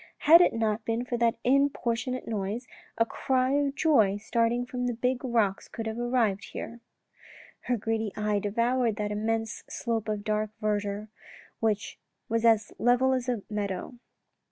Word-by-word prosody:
" - - -50
Had 335 +1 +11
it - - +5
not 220 -1 0
been 230 +2 -1
for 245 - -2
that 235 -1 +3
importunate 255 -2 +1
noise, 215 +3 -3 0.3
a 230 - +4
cry 255 +2 0
of 285 0 +1
joy 220 -13 +3
starting 230 +3 0
from 250 0 -3
the 245 - -1
big 250 +2 -1
rocks 225 -6 0
could 225 - -6
have 220 +1 -4
arrived 240 -5 +1
here." 235 +1 -6 0.9
Her 245 - +1
greedy 225 0 -2
eye 210 -1 +1
devoured 235 +3 +1
that 210 -1 -3
immense 220 +1 -2
slope 225 -2 -2
of 210 -1 -2
dark 215 0 0
verdure 210 -1 -2 0.5
which 215 -2 -1 0.3
was 230 0 0
as 220 -2 +4
level 250 +2 +3
as 255 -1 -1
a 235 -5 -1
meadow. 210 +3 -4
230 Hz, 160 wpm, -28 LUFS, 210-245 Hz, 0.9 s, Had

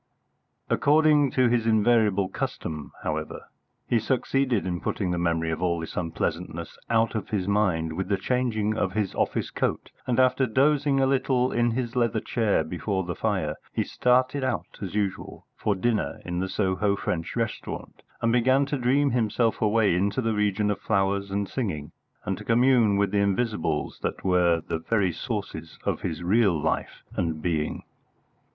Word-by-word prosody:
According 150 -1 +4
to 130 -1 +4
his 115 -1 +1
invariable 110 -3 +3
custom, 75 -4 -5
however, - - -3 0.4
he 120 - +2
succeeded 130 -1 0
in 90 -1 -2
putting 95 -4 -2
the 90 - -1
memory 80 -1 0
of 80 - -3
all 85 -2 +1
this 80 - -7
unpleasantness 85 -2 -3
out 115 -1 +2
of 110 -4 -4
his 100 -3 -1
mind 95 -6 +1
with 95 +4 -3
the 100 - +1
changing 110 -1 0
of 95 -4 -1
his 105 -3 -1
office - - -1
coat, - - -2 0.2
and 125 0 +1
after 130 +1 +3
dozing 140 +3 +2
a 135 - +4
little 130 -1 +1
in 120 0 +2
his 120 0 -3
leather 115 -2 +1
chair 110 -7 +1
before 95 +4 -2
the 85 0 -4
fire, - - -1 0.2
he - - 0
started 130 +2 +1
out 130 -2 -3
as 95 -1 -5
usual 100 -3 -3
for 105 - 0
dinner 110 +1 -1
in 90 0 -3
the 95 +1 -2
Soho 100 +1 +1
French 85 -4 -3
restaurant, 115 -2 -4 0.2
and 115 - +3
began 130 +3 +3
to 140 0 -2
dream 135 +3 +2
himself 115 -1 +1
away 110 -2 +3
into 100 +5 0
the 115 -3 0
region 105 0 +1
of 105 - -3
flowers 100 -1 0
and 100 0 -1
singing, 95 - -3 0.3
and - - -2
to - - -8
commune 120 -3 +4
with 100 -1 +1
the 105 - +2
Invisibles 100 -6 -1
that - - -3
were 90 -3 +3
the 80 - -2
very 95 +1 +1
sources 90 - -5
of - - -1
his 80 +2 -4
real 95 -2 +3
life 80 +2 -2
and 80 -3 -1
being. 75 -2 -2
105 Hz, 170 wpm, -26 LUFS, 90-120 Hz, 0.4 s, According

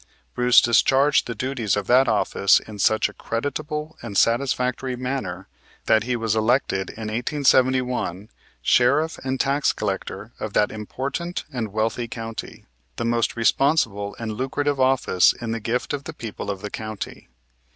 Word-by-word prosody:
Bruce 125 0 +5
discharged 135 +5 +3
the 115 - -4
duties 120 -3 -1
of 100 - -2
that 130 +4 +4
office 105 -3 +3
in 105 -2 -11
such 110 +3 +3
a - - -12
creditable 150 +5 -4
and 105 -4 -5
satisfactory 125 +1 +1
manner 125 -8 -4 0.4
that 110 0 +3
he 125 0 0
was 115 -2 -1
elected 110 -4 +1
in 110 - -8
1871 125 -5 +1 0.3
Sheriff 150 - +3
and 130 0 -2
Tax 140 +1 +2
Collector 100 +1 -4
of 110 - -5
that 105 - +2
important 135 +11 -4
and 115 -5 -3
wealthy 110 +3 -1
county, 115 -1 -7 0.3
the - - -3
most 115 0 0
responsible 115 -4 +1
and 115 -2 -4
lucrative 135 +5 -1
office 130 -8 +4
in 115 -2 -6
the 115 - -2
gift 120 +6 -2
of 140 -1 -4
the 160 - -6
people 110 -6 -7
of 100 -2 -4
the 105 - -5
county. 110 -9 -7
120 Hz, 150 wpm, -23 LUFS, 110-135 Hz, 0.4 s, Bruce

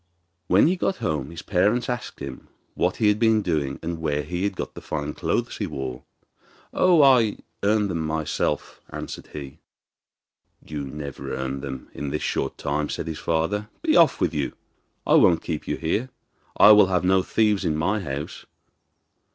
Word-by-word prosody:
When 95 - +5
he 175 +4 +3
got 190 - 0
home 75 - -2
his 85 0 -8
parents 105 +6 +1
asked 125 - -5
him 70 -2 -7 0.3
what - - 0
he 110 - +2
had 105 0 +3
been 110 -2 +3
doing 70 -6 -1
and 85 0 -3
where 75 -2 -1
he 90 +5 -3
had 100 -1 -1
got - - -5
the - - -9
fine 75 -1 -4
clothes - - -2
he - - -2
wore. 65 -2 -6 0.7
'Oh, 175 -5 +5
I 125 -6 +5 0.2
earned 105 -1 +2
them 85 - -2
myself,' 80 -1 -2
answered - - -7
he. 70 -2 -8 1.1
'You 75 -2 -5
never 70 0 -6
earned 65 +1 -3
them 65 -2 -7
in 70 - -4
this 75 +2 -3
short - - -2
time,' 75 +1 -2
said - - -3
his 80 -2 -5
father. 95 +6 -1
'Be - - +3
off - - +5
with - - +1
you; 75 -3 -2 0.5
I - - +2
won't 85 - +5
keep 80 -3 -4
you - - -1
here. 105 +10 -1 0.5
I 105 - +9
will 105 -2 +7
have 90 -1 +1
no 95 +1 +4
thieves 105 +1 +1
in 80 -4 0
my 95 +8 0
house! 70 -5 -6
85 Hz, 180 wpm, -24 LUFS, 75-105 Hz, 1.1 s, I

